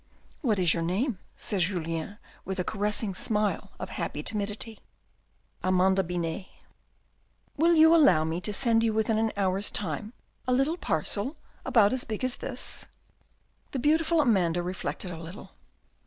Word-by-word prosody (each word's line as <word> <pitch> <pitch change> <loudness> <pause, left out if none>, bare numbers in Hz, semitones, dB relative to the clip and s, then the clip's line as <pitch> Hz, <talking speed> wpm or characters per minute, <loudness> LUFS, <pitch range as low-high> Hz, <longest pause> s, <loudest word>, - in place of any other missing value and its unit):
" - - -32
What 230 -9 +1
is 180 -3 +4
your 170 - -1
name? 190 - -1
" - - -36
said 200 -3 -2
Julien, 165 +1 -2 0.3
with 190 - -4
the 180 - 0
caressing 210 0 0
smile 210 +2 0
of - - -6
happy - - -4
timidity. 210 +1 -3 0.8
"Amanda 185 +1 +3
Binet." 175 +1 -3 1.1
"Will 335 +3 +4
you 320 +1 +7
allow 280 - +6
me 160 +2 -2
to 210 - -2
send 230 0 +3
you 225 -1 +1
within 220 0 +1
an 220 0 +1
hour's 195 0 +1
time 205 +4 -3 0.3
a 255 - +2
little 270 +6 +2
parcel 200 - -1 0.3
about 220 -3 +4
as 260 - 0
big 220 +2 -5
as 255 -1 +1
this? - - -1 0.4
" - - -41
The - - -1
beautiful 315 +5 +2
Amanda 180 - +2
reflected 180 0 -4
a 165 - -7
little. 170 +5 -10
205 Hz, 160 wpm, -28 LUFS, 180-235 Hz, 1.1 s, you